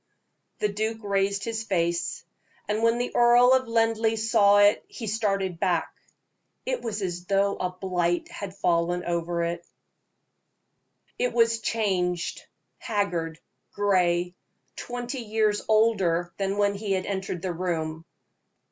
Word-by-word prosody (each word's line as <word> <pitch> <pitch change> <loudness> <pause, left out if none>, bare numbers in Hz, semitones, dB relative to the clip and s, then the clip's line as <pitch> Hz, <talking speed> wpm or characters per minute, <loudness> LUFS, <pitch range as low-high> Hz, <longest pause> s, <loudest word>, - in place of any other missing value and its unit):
The 210 - +1
duke 220 +2 -3
raised 200 0 0
his 225 -1 -3
face, 170 -4 -1 0.4
and 210 +1 -1
when 230 +1 +3
the 245 +1 -3
Earl 240 +1 +6
of 260 -1 +2
Linleigh 225 -1 +2
saw 215 -2 +4
it 205 0 +5
he 235 - -8
started 195 -4 -1
back. 175 -3 0 0.7
It - - -2
was 215 -3 -3
as 175 -1 -4
though 200 +1 +2
a 180 - -1
blight 180 -2 -1
had 195 -2 -7
fallen 175 -1 0
over 170 0 -1
it 170 0 -3 1.6
it 250 -1 0
was 230 -1 +3
changed, 180 -6 -1 0.3
haggard, 175 -7 -2 0.4
gray 180 -3 +1 0.4
twenty 245 +2 -5
years 215 -1 +1
older 195 -6 +2
than 195 0 -1
when 205 0 +2
he 200 0 -2
had 185 -1 -1
entered 190 -3 -4
the 185 -2 -2
room. 165 -2 -3
200 Hz, 130 wpm, -26 LUFS, 175-220 Hz, 1.6 s, Earl